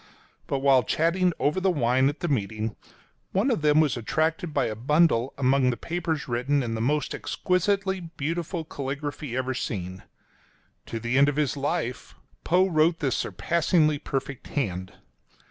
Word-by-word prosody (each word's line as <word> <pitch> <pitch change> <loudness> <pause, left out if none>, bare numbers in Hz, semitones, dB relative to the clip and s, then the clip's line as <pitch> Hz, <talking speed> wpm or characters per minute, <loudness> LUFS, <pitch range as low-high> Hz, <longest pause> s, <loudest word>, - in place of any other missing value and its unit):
But 135 - -1
while 135 -2 +5
chatting 170 - +1
over 150 +6 +1
the 190 +1 +2
wine 130 -4 +2
at 145 - -7
the 175 - -1
meeting, 110 -5 -2 0.6
one 210 +8 +2
of 225 - 0
them 150 0 +4
was 155 -3 +3
attracted 160 +8 -1
by - - +1
a 110 - -2
bundle 135 0 +2
among 130 -1 +3
the 120 - -1
papers 165 -3 -3
written 130 +3 0
in 115 -2 -3
the 110 - -2
most 150 +5 0
exquisitely 190 +1 0
beautiful 165 +1 -4
caligraphy 145 -2 -4
ever 130 0 -1
seen. 95 -7 -4 0.4
— 65 - -37
To 115 - -4
the 120 +4 +1
end 140 +1 +6
of 145 - -2
his 150 -2 0
life 140 -3 -3 0.3
Poe 180 +3 +3
wrote 165 -1 +3
this 135 -6 0
surpassingly 160 -3 +1
perfect 135 -1 -4
hand. 95 -9 -3
145 Hz, 165 wpm, -26 LUFS, 125-165 Hz, 0.6 s, end